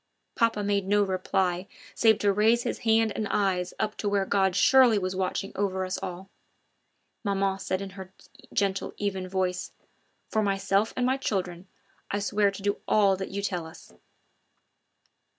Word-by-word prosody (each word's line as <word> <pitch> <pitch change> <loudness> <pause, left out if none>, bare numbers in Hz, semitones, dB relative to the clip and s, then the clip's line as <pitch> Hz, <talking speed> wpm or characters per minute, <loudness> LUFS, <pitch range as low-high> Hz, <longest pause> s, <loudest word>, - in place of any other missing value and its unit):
Papa 225 -3 +1
made 200 -1 0
no 205 +1 +3
reply 185 -1 -1 0.3
save 220 -2 +4
to 205 -2 +2
raise 225 +4 +3
his - - -3
hand 225 -1 +3
and 215 - -2
eyes 185 -3 0
up 215 0 -1
to 205 - -1
where 200 -1 +1
God 190 -2 +1
surely 250 +1 +6
was 185 -1 -2
watching 190 +1 -2
over 190 -2 -1
us 185 +1 -3
all. 180 +2 -6 1.0
Maman 195 -2 0
said 185 0 -2
in 195 - -7
her 190 -1 -10 0.4
gentle, 195 -1 -1
even 190 -2 -2
voice: 185 -1 -2 0.5
"For 220 - 0
myself 195 +1 +1
and 250 - +1
my 260 +1 +2
children, 185 -7 -3 0.4
I 200 - -1
swear 205 0 +2
to 195 0 -8
do 205 0 -1
all 200 -2 +4
that 190 - -5
you 200 +1 -4
tell 180 -5 -2
us." 160 - -14
195 Hz, 165 wpm, -27 LUFS, 190-205 Hz, 1.0 s, surely